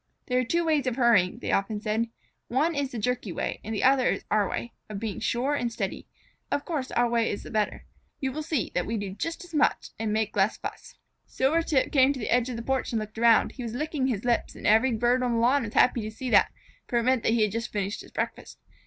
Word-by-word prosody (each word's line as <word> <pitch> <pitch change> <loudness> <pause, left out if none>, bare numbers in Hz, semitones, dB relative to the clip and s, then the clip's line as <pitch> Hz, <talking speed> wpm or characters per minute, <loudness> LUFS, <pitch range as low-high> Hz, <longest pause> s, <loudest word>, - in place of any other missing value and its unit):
"There 250 0 +1
are - - +2
two 335 +8 0
ways 300 -5 +1
of 250 - 0
hurrying," 230 -8 +3
they - - -3
often 205 +2 0
said. 220 +2 -1 0.4
"One 295 +7 +1
is 285 -2 -2
the 240 - -5
jerky 240 -2 -1
way - - -3
and 220 - -6
the 215 - -2
other 260 -1 +4
is - - -1
our 210 -2 +2
way, 235 - -4 0.2
of 210 - -5
being 215 -2 -4
sure 255 +4 0
and 245 -5 -1
steady. - - -4 0.4
Of 285 - -1
course 290 -6 -3
our 240 0 +2
way 235 -1 +1
is 200 - -4
the - - -10
better. 215 -2 -1 0.3
You 265 -1 -1
will 305 +4 -4
see 300 - -2
that 180 - -1
we 225 +1 -1
do 200 -2 -4
just 330 - -4
as 350 -1 -15
much 300 -1 +2
and 220 -1 -1
make 215 0 -1
less 200 +2 +2
fuss." - - -8 0.3
Silvertip 290 0 +1
came 270 -1 +5
to 270 - -7
the 215 - -3
edge 245 +1 +2
of 250 - -4
the 230 - -5
porch 265 +1 -1
and 230 - 0
looked 215 +1 -7
around. 230 -1 +5
He 260 - -9
was 235 -1 -5
licking 295 -1 -1
his 230 -4 -2
lips, 240 -1 0
and - - -9
every 225 +5 +5
bird 240 +3 +2
on 245 -1 0
the 230 - +1
lawn 255 +5 +3
was 220 -3 -6
happy 245 -2 +4
to 215 - -4
see 245 +3 -5
that, - - +5 0.4
for 240 - 0
it 235 - +2
meant 255 0 +2
that 225 - +2
he 230 -2 +3
had 210 - +1
just 230 +2 -3
finished 205 0 -2
his - - -13
breakfast. - - -4
240 Hz, 260 wpm, -27 LUFS, 220-265 Hz, 0.4 s, came